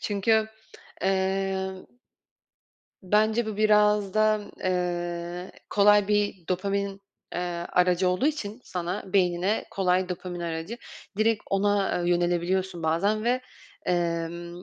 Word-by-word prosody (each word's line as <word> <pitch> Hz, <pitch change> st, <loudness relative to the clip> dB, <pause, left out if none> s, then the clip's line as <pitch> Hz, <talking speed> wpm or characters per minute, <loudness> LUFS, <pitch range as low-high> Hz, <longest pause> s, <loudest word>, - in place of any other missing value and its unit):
Çünkü 220 Hz, +2 st, +1 dB, 0.5 s
eee 190 Hz, 0 st, 0 dB, 1.3 s
bence 215 Hz, +4 st, +2 dB
bu 215 Hz, -2 st, -4 dB
biraz 210 Hz, -2 st, +3 dB
da, 215 Hz, 0 st, +3 dB, 0.2 s
eee, 175 Hz, 0 st, -2 dB, 0.2 s
kolay 205 Hz, 0 st, +5 dB
bir 205 Hz, -4 st, 0 dB
dopamin, 195 Hz, +1 st, -1 dB, 0.3 s
eee, 175 Hz, -, -1 dB, 0.3 s
aracı 180 Hz, 0 st, +3 dB
olduğu 180 Hz, +10 st, +1 dB
için 245 Hz, -7 st, -3 dB
sana, 180 Hz, +3 st, -3 dB
beynine 185 Hz, +2 st, +2 dB
kolay 185 Hz, -1 st, +1 dB
dopamin 180 Hz, -1 st, -5 dB
aracı. 165 Hz, +6 st, -4 dB, 0.4 s
Direkt 220 Hz, -1 st, +2 dB
ona, 200 Hz, -1 st, +2 dB
eee, 175 Hz, -, +1 dB
yönelebiliyorsun 175 Hz, +1 st, 0 dB
bazen 200 Hz, +7 st, +1 dB
ve, 250 Hz, +2 st, +2 dB, 0.5 s
emm, 170 Hz, 0 st, -2 dB
190 Hz, 105 wpm, -26 LUFS, 175-210 Hz, 1.3 s, kolay